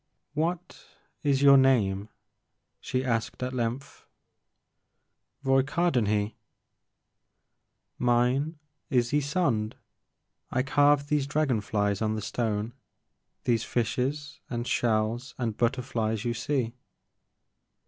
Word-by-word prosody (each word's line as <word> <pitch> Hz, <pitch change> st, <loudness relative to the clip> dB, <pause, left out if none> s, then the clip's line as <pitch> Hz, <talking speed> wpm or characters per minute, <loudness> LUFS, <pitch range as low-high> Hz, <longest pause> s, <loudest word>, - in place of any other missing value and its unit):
What 165 Hz, +3 st, -2 dB, 0.4 s
is 140 Hz, -2 st, +2 dB
your 140 Hz, -1 st, +9 dB
name? 110 Hz, -7 st, +3 dB, 0.7 s
she 130 Hz, +1 st, -2 dB
asked 115 Hz, 0 st, -1 dB
at 130 Hz, +1 st, -3 dB
length. 125 Hz, +2 st, -4 dB, 1.4 s
Roy 135 Hz, 0 st, +4 dB
Cardenhe.*' 120 Hz, -9 st, +1 dB, 1.7 s
Mine 125 Hz, +6 st, +2 dB, 0.3 s
is 120 Hz, -3 st, +2 dB
Ysonde. 140 Hz, -7 st, 0 dB, 0.7 s
I 130 Hz, -, 0 dB
carved 145 Hz, +1 st, +3 dB
these 145 Hz, -2 st, +1 dB
dragon 145 Hz, -6 st, +1 dB
flies 105 Hz, -1 st, 0 dB
on 110 Hz, 0 st, +1 dB
the 110 Hz, -, -3 dB
stone, 110 Hz, -1 st, -2 dB, 0.7 s
these 115 Hz, -2 st, +1 dB
fishes 135 Hz, +5 st, -2 dB
and 120 Hz, -1 st, -3 dB
shells 115 Hz, +2 st, 0 dB
and 115 Hz, -4 st, -2 dB
butterflies 115 Hz, -3 st, -1 dB
you 120 Hz, -, 0 dB
see." 120 Hz, 0 st, -1 dB
125 Hz, 95 wpm, -28 LUFS, 110-140 Hz, 1.7 s, your